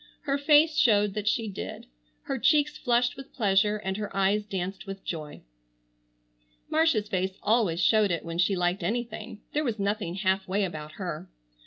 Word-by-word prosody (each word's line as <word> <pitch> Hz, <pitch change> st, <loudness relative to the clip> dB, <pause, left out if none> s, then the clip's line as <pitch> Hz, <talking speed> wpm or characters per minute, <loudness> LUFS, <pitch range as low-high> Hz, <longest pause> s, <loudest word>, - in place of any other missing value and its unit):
Her 280 Hz, -1 st, -1 dB
face 300 Hz, +2 st, +5 dB
showed 210 Hz, -4 st, +4 dB
that 210 Hz, 0 st, -4 dB
she 225 Hz, +1 st, +1 dB
did. 200 Hz, -, -6 dB, 0.4 s
Her 270 Hz, -, -3 dB
cheeks 300 Hz, +3 st, +3 dB
flushed 245 Hz, -1 st, +1 dB
with 270 Hz, +1 st, -12 dB
pleasure, 210 Hz, -2 st, +2 dB
and 190 Hz, -2 st, -3 dB
her 210 Hz, -1 st, -4 dB
eyes 205 Hz, +2 st, +2 dB
danced 190 Hz, 0 st, -4 dB
with 195 Hz, 0 st, -7 dB
joy. 155 Hz, -3 st, -6 dB, 1.3 s
Marcia's 310 Hz, -10 st, +2 dB
face 190 Hz, -1 st, -2 dB
always 210 Hz, -6 st, +2 dB
showed 215 Hz, +1 st, +4 dB
it 170 Hz, -1 st, -2 dB
when 165 Hz, 0 st, -5 dB
she 190 Hz, +2 st, +3 dB
liked 180 Hz, +1 st, 0 dB
anything. 230 Hz, +2 st, -4 dB
There 300 Hz, -, +1 dB
was 235 Hz, -6 st, -1 dB
nothing 200 Hz, -3 st, -2 dB
half 190 Hz, 0 st, 0 dB
way 200 Hz, +2 st, 0 dB
about 155 Hz, -4 st, -5 dB
her. 180 Hz, -2 st, -6 dB
205 Hz, 170 wpm, -27 LUFS, 185-235 Hz, 1.3 s, face